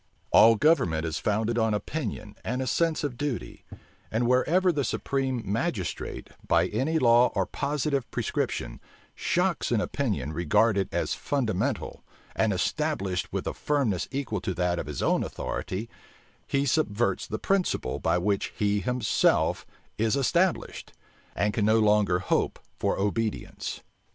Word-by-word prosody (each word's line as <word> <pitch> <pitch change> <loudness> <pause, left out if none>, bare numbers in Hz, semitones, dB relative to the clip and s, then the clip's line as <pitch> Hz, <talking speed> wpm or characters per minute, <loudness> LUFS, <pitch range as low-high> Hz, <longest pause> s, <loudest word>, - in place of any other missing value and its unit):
All 115 +1 +7
government 90 - +2
is 80 - -2
founded 110 +3 0
on 110 -1 +2
opinion 105 -4 -4
and 125 +3 -2
a 130 - -1
sense 160 +6 +1
of 130 -5 -3
duty; 145 -5 -4 0.4
and 115 +2 0
wherever 170 +9 +3
the 145 -4 -1
supreme 130 -2 -1
magistrate, 105 - -3 0.2
by - - +3
any 160 +5 0
law 120 -3 +5
or 95 -2 +2
positive 140 +3 -2
prescription, - - -2 0.3
shocks 180 -4 0
an 120 - +3
opinion 105 - -2
regarded 95 +5 +2
as - - -1
fundamental, 120 -10 -2 0.3
and 110 -1 +2
established 100 - -1
with - - -3
a - - -2
firmness 135 - 0
equal 130 -8 -3
to 95 -2 -3
that 90 0 0
of - - -5
his - - -4
own - - +2
authority, 100 +5 -4 0.6
he 140 0 +1
subverts 120 - 0
the 110 - -3
principle 185 - 0
by - - +1
which 100 +2 -1
he 105 0 +1
himself 125 +3 +1 0.3
is 110 +2 +2
established, 170 +6 0 0.4
and 105 +3 +1
can 105 - +1
no 110 +1 +4
longer 105 -4 +3
hope 90 - 0 0.2
for - - 0
obedience. 105 +2 -2
115 Hz, 140 wpm, -27 LUFS, 100-140 Hz, 0.6 s, All